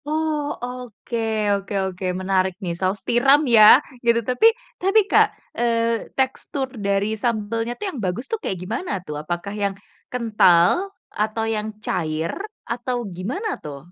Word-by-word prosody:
Oh, 305 Hz, -1 st, -1 dB
oke 250 Hz, -2 st, -6 dB, 0.4 s
oke 200 Hz, 0 st, -3 dB
oke 185 Hz, 0 st, -5 dB, 0.2 s
menarik 190 Hz, 0 st, +1 dB
nih 175 Hz, -2 st, -2 dB
saus 190 Hz, +2 st, 0 dB
tiram 270 Hz, +4 st, +5 dB, 0.2 s
ya 215 Hz, -, +8 dB, 0.4 s
gitu, 235 Hz, 0 st, +4 dB
tapi 255 Hz, -, +2 dB, 0.4 s
tapi 390 Hz, +4 st, +4 dB
Kak, -, -, +6 dB, 0.3 s
eee, 230 Hz, -1 st, 0 dB
tekstur 265 Hz, +1 st, -1 dB, 0.2 s
dari 200 Hz, +2 st, +1 dB
sambelnya 230 Hz, 0 st, -1 dB
tuh 420 Hz, -, -5 dB
yang 270 Hz, -, -6 dB
bagus 185 Hz, +8 st, -2 dB
tuh 450 Hz, -, -1 dB
kayak 190 Hz, -, -3 dB
gimana 230 Hz, -, -4 dB
tuh? 150 Hz, -, -6 dB
Apakah 175 Hz, +5 st, -4 dB
yang, 200 Hz, -1 st, -1 dB, 0.4 s
kental? 225 Hz, -, +3 dB, 0.3 s
Atau 220 Hz, +1 st, 0 dB
yang 210 Hz, 0 st, -2 dB, 0.2 s
cair? 160 Hz, -1 st, -1 dB, 0.4 s
Atau 245 Hz, +1 st, -2 dB, 0.2 s
gimana 255 Hz, -, -3 dB, 0.2 s
tuh? 145 Hz, -2 st, -6 dB
225 Hz, 140 wpm, -22 LUFS, 190-250 Hz, 0.4 s, ya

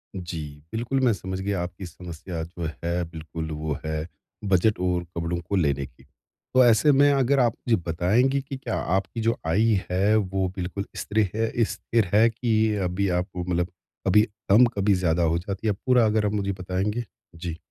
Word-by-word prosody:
जी, 85 Hz, -3 st, -5 dB, 0.3 s
बिल्कुल, 120 Hz, +4 st, -1 dB
मैं 120 Hz, -, +4 dB
समझ 95 Hz, -1 st, -5 dB
गया 100 Hz, -1 st, -1 dB
आपकी 90 Hz, +2 st, -7 dB
समस्या 85 Hz, 0 st, -7 dB
जो 85 Hz, -1 st, -5 dB
है 85 Hz, +1 st, 0 dB
बिल्कुल, 80 Hz, -1 st, -6 dB
वो 75 Hz, -1 st, -3 dB
है 80 Hz, +1 st, -2 dB, 0.4 s
बजट 100 Hz, +2 st, +2 dB
और 90 Hz, -1 st, 0 dB
कपड़ों 85 Hz, +1 st, -1 dB
को 100 Hz, -, +1 dB
लेने 70 Hz, -6 st, +1 dB
की। 65 Hz, +1 st, -18 dB, 0.5 s
तो 130 Hz, -, +7 dB
ऐसे 120 Hz, +6 st, +5 dB
में 145 Hz, +1 st, +5 dB
अगर 135 Hz, 0 st, +3 dB
आप 120 Hz, -2 st, +3 dB
मुझे 115 Hz, -, +5 dB
बताएँगी 110 Hz, +12 st, +2 dB
कि 135 Hz, 0 st, -7 dB
क्या 120 Hz, -4 st, -4 dB, 0.2 s
आपकी 95 Hz, +4 st, -2 dB
जो 115 Hz, +1 st, +1 dB
आय 100 Hz, +8 st, +3 dB, 0.3 s
है 100 Hz, +4 st, +3 dB
वो 95 Hz, -2 st, 0 dB
बिल्कुल 95 Hz, +2 st, -4 dB
स्त्रे 105 Hz, -2 st, 0 dB
है 115 Hz, 0 st, +1 dB
स्थिर 115 Hz, 0 st, 0 dB
है 110 Hz, +3 st, +6 dB
की 110 Hz, -2 st, +1 dB
अभी 90 Hz, +2 st, 0 dB
आपको 90 Hz, -1 st, -4 dB
मतलब 90 Hz, 0 st, -1 dB, 0.4 s
कभी 105 Hz, +3 st, +6 dB, 0.3 s
कम 110 Hz, +6 st, +7 dB
कभी 100 Hz, 0 st, +3 dB
ज़्यादा 85 Hz, -2 st, +1 dB
हो 85 Hz, +1 st, +2 dB
जाती 100 Hz, +4 st, -4 dB
है 105 Hz, -, +3 dB
पूरा 125 Hz, -3 st, +5 dB
अगर 110 Hz, 0 st, +2 dB
आप 105 Hz, -, +1 dB
मुझे 100 Hz, -1 st, 0 dB
बताएँगे। 95 Hz, +5 st, -2 dB, 0.3 s
जी। 85 Hz, -1 st, -5 dB
95 Hz, 185 wpm, -25 LUFS, 85-110 Hz, 0.5 s, तो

